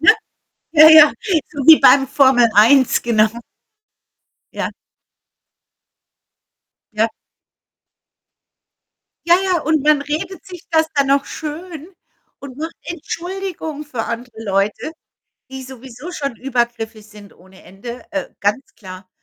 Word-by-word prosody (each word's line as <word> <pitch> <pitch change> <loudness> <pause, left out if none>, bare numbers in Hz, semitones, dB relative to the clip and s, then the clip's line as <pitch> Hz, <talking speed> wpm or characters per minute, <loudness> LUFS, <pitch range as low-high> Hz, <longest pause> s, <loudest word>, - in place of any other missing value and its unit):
Ne? 325 - +7 0.6
Ja, 310 0 +8
ja. 310 -2 +8 0.4
So 285 -3 -5
wie 320 0 +8
beim 270 +1 +5
Formel 260 -4 +3
1, 250 +6 +4
genau. 220 -2 +2 1.3
Ja. - - -4 2.2
Ja. 220 +2 +1 2.2
Ja, 345 - +7
ja, 360 -4 0
und 310 -1 0
man 300 -1 +3
redet 325 +8 -5
sich 360 -1 -12
das 320 -1 +2
dann 280 -2 +1
noch 280 0 +2
schön 320 +1 -8 0.5
und 275 -2 -11
macht 320 +2 -6
Entschuldigungen 345 -2 -6
für 260 -7 -5
andere 230 -1 -7
Leute, 200 +9 -2 0.6
die 265 0 -7
sowieso 260 +4 -11
schon 280 -8 -5
übergriffig 235 -4 -3
sind 210 -1 -16
ohne 190 +1 -19
Ende, 235 +6 -10
äh, 295 -2 -4
ganz 210 +7 -2
klar. 185 -2 -12
275 Hz, 115 wpm, -18 LUFS, 230-315 Hz, 2.2 s, Ja